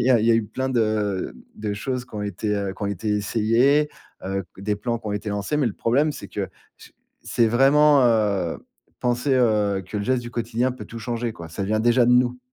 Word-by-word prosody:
il -, -, +1 dB
y -, -, +4 dB
a 125 Hz, -, +6 dB
il 110 Hz, -, +1 dB
y -, -, +5 dB
a -, -, +5 dB
eu 115 Hz, -1 st, +2 dB
plein 130 Hz, +5 st, -3 dB
de 110 Hz, -6 st, 0 dB, 0.2 s
de 105 Hz, -1 st, -3 dB
choses 125 Hz, +4 st, -3 dB
qui 125 Hz, -, -17 dB
ont 105 Hz, -, -3 dB
été, 105 Hz, +1 st, -2 dB
heu, 100 Hz, -1 st, -2 dB
qui -, -, -9 dB
ont -, -, 0 dB
été 100 Hz, +2 st, -3 dB
essayées, 115 Hz, +8 st, +2 dB, 0.4 s
heu, 95 Hz, +1 st, -2 dB, 0.2 s
des 105 Hz, +2 st, -1 dB
plans 115 Hz, +3 st, -2 dB
qui 110 Hz, -, -11 dB
ont -, -, -2 dB
été 105 Hz, +1 st, -4 dB
lancés, 105 Hz, +8 st, -2 dB
mais 145 Hz, -3 st, +2 dB
le 115 Hz, -, -1 dB
problème 140 Hz, +6 st, +1 dB
c'est -, -, -9 dB
que -, -, -4 dB, 0.7 s
c'est 115 Hz, -, +2 dB
vraiment, 140 Hz, +4 st, +5 dB
heu, 105 Hz, -7 st, +1 dB, 0.4 s
penser, 125 Hz, +3 st, +1 dB
heu, 105 Hz, -5 st, +2 dB
que 100 Hz, -, -6 dB
le 100 Hz, -, -3 dB
geste 130 Hz, +1 st, +1 dB
du 120 Hz, -, -8 dB
quotidien 120 Hz, +2 st, -1 dB
peut 130 Hz, -, -9 dB
tout 115 Hz, -, -8 dB
changer, 115 Hz, +1 st, -3 dB
quoi. 85 Hz, -5 st, -10 dB
Ça 90 Hz, +5 st, -4 dB
vient 110 Hz, +2 st, 0 dB
déjà 120 Hz, +1 st, +4 dB
de 125 Hz, -, +5 dB
nous. 125 Hz, 0 st, +3 dB
115 Hz, 240 wpm, -23 LUFS, 105-125 Hz, 0.7 s, a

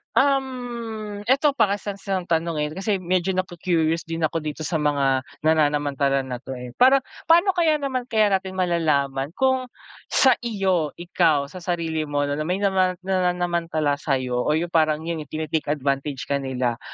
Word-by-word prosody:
Um, 240 Hz, -6 st, -1 dB
eto 280 Hz, +3 st, +4 dB
pa 220 Hz, -6 st, +3 dB
kase 205 Hz, 0 st, -5 dB
kase 195 Hz, 0 st, -13 dB
kang 185 Hz, -2 st, 0 dB
tanungin 160 Hz, -3 st, -1 dB
kasi 195 Hz, +2 st, -1 dB
medyo 185 Hz, +1 st, 0 dB
naku-curious 170 Hz, -2 st, 0 dB
din 165 Hz, 0 st, -3 dB
ako 165 Hz, -, -1 dB
dito 155 Hz, +1 st, -5 dB
sa 160 Hz, 0 st, -1 dB
mga 140 Hz, -3 st, +2 dB, 0.2 s
nananamantala 145 Hz, -3 st, +2 dB
na 125 Hz, -2 st, -5 dB
'to 135 Hz, -1 st, -7 dB
eh, 125 Hz, -1 st, -8 dB
parang 265 Hz, +1 st, +6 dB, 0.3 s
paano 345 Hz, +4 st, +6 dB
kaya 325 Hz, -3 st, +3 dB
naman 260 Hz, -3 st, -3 dB
kaya 215 Hz, -2 st, +3 dB
natin 190 Hz, 0 st, -1 dB
malalaman 150 Hz, -6 st, +1 dB
kung 260 Hz, -1 st, +2 dB, 0.4 s
sa 260 Hz, -2 st, +5 dB
iyo, 190 Hz, -9 st, 0 dB
ikaw 165 Hz, -4 st, +2 dB
sa 185 Hz, -, -8 dB
sarili 165 Hz, -3 st, -2 dB
mo 145 Hz, 0 st, 0 dB
na 145 Hz, +1 st, -2 dB
may 180 Hz, +2 st, 0 dB
nama 190 Hz, -2 st, +2 dB
nananamantala 175 Hz, -5 st, 0 dB
sa'yo 130 Hz, -4 st, -1 dB
o 150 Hz, -, +1 dB
'yung 170 Hz, +1 st, -3 dB
parang 155 Hz, -1 st, +2 dB
'yun 165 Hz, -2 st, -3 dB
nga 150 Hz, -, -10 dB
tini-take 155 Hz, -1 st, -2 dB
advantage 140 Hz, -1 st, -1 dB
ka 140 Hz, 0 st, 0 dB
nila 125 Hz, -3 st, -2 dB
170 Hz, 165 wpm, -23 LUFS, 150-200 Hz, 0.4 s, parang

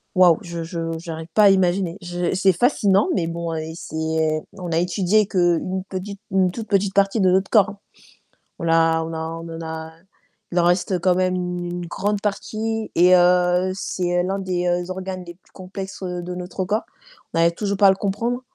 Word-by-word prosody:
waouh, 180 Hz, -3 st, +6 dB
je 170 Hz, -1 st, -5 dB
je 165 Hz, -1 st, -4 dB
j'arrive 160 Hz, -1 st, -7 dB
pas 215 Hz, -, +5 dB
à 200 Hz, -, +8 dB
imaginer. 185 Hz, -1 st, +2 dB
Je 175 Hz, 0 st, -2 dB
c'est 190 Hz, 0 st, +3 dB
fascinant, 205 Hz, -, +2 dB
mais 165 Hz, -, 0 dB
bon 170 Hz, 0 st, -4 dB
heu, 160 Hz, -, -2 dB, 0.2 s
c'est 160 Hz, -1 st, -1 dB
on 180 Hz, -4 st, -6 dB
a 160 Hz, -, +1 dB
étudié 185 Hz, +4 st, +2 dB
qu'une 185 Hz, +1 st, +1 dB
petite, 195 Hz, +1 st, -6 dB
une 190 Hz, -1 st, +2 dB
toute 220 Hz, +3 st, -7 dB
petite 195 Hz, -1 st, +1 dB
partie 200 Hz, +2 st, +2 dB
de 190 Hz, -2 st, +4 dB
notre 190 Hz, +2 st, +2 dB
corps 210 Hz, -3 st, +4 dB
hein. 200 Hz, -, -13 dB, 0.8 s
On 170 Hz, -, -3 dB
a 165 Hz, 0 st, +3 dB
on 165 Hz, 0 st, -6 dB
a -, -, -3 dB, 0.3 s
on 165 Hz, -, -8 dB
en -, -, -7 dB
a 160 Hz, 0 st, -6 dB, 0.6 s
il 175 Hz, -, +1 dB
en -, -, +3 dB
reste 180 Hz, +1 st, +1 dB
quand 180 Hz, +1 st, +3 dB
même 185 Hz, 0 st, +1 dB
une 175 Hz, -1 st, -3 dB
grande 205 Hz, +4 st, -2 dB
partie 220 Hz, +2 st, -3 dB
et 180 Hz, +2 st, +6 dB
heu, 180 Hz, +1 st, +3 dB
c'est 175 Hz, -2 st, -1 dB
l'un 190 Hz, +2 st, -2 dB
des 180 Hz, -1 st, -1 dB
organes 185 Hz, 0 st, -5 dB
les 175 Hz, 0 st, -10 dB
plus 185 Hz, -, -31 dB
complexes, 190 Hz, +1 st, -8 dB
heu, 180 Hz, -1 st, -3 dB
de 180 Hz, +1 st, -5 dB
notre 180 Hz, +1 st, -4 dB
corps. 210 Hz, +4 st, -1 dB, 0.5 s
On 165 Hz, -, 0 dB
arrive 170 Hz, 0 st, +4 dB
toujours 200 Hz, +2 st, -2 dB
pas 200 Hz, -, +4 dB
à -, -, +8 dB
le 190 Hz, -, 0 dB
comprendre 230 Hz, +6 st, -2 dB
180 Hz, 200 wpm, -22 LUFS, 175-195 Hz, 0.8 s, à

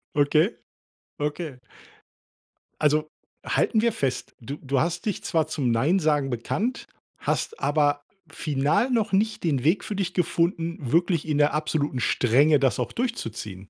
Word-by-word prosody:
Okay, 150 Hz, +5 st, +4 dB, 0.7 s
okay. 150 Hz, -2 st, -3 dB, 1.2 s
Also, 150 Hz, +1 st, +2 dB, 0.4 s
halten 220 Hz, -2 st, +2 dB
wir 235 Hz, -, +3 dB
fest, 130 Hz, -, -3 dB
du 135 Hz, +5 st, -6 dB
du 135 Hz, -1 st, 0 dB
hast 170 Hz, -, -1 dB
dich 210 Hz, -4 st, -2 dB
zwar 160 Hz, -2 st, +1 dB
zum 140 Hz, -6 st, -1 dB
Nein-Sagen 150 Hz, +2 st, +2 dB
bekannt, 195 Hz, -, -2 dB, 0.3 s
hast 455 Hz, -, -2 dB
aber 145 Hz, -1 st, +1 dB, 0.3 s
final 150 Hz, -, 0 dB
noch 225 Hz, -5 st, 0 dB
nicht 215 Hz, +2 st, +1 dB
den 140 Hz, -7 st, 0 dB
Weg 165 Hz, +6 st, +2 dB
für 210 Hz, -, -4 dB
dich 185 Hz, -2 st, -2 dB
gefunden, 170 Hz, -1 st, 0 dB
wirklich 170 Hz, -2 st, +2 dB
in 150 Hz, -2 st, 0 dB
der 145 Hz, 0 st, +3 dB
absoluten 150 Hz, -3 st, -1 dB
Strenge 140 Hz, +7 st, +3 dB
das 135 Hz, -2 st, +2 dB
auch 125 Hz, -, -2 dB
durchzuziehen. 110 Hz, -, -4 dB
155 Hz, 140 wpm, -25 LUFS, 140-175 Hz, 1.2 s, Okay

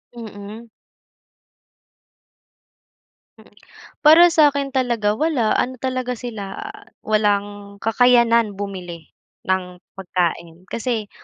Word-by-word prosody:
Mm. 220 Hz, 0 st, -10 dB, 2.7 s
Mm, -, -, -20 dB, 0.5 s
para 340 Hz, +3 st, +8 dB
sa'kin 285 Hz, -3 st, +2 dB
talaga 235 Hz, -5 st, 0 dB
wala, 295 Hz, -9 st, +1 dB
ano 255 Hz, +1 st, -1 dB
talaga 255 Hz, -1 st, -2 dB
sila, 220 Hz, -, -7 dB
ah, 415 Hz, 0 st, -10 dB, 0.2 s
walang 205 Hz, -1 st, -1 dB
kakayanan 235 Hz, -1 st, +3 dB
bumili 180 Hz, -5 st, -8 dB, 0.3 s
ng 180 Hz, -1 st, -3 dB, 0.2 s
pagkain 175 Hz, -2 st, -3 dB
kasi 230 Hz, -3 st, -3 dB
220 Hz, 85 wpm, -20 LUFS, 200-255 Hz, 2.7 s, para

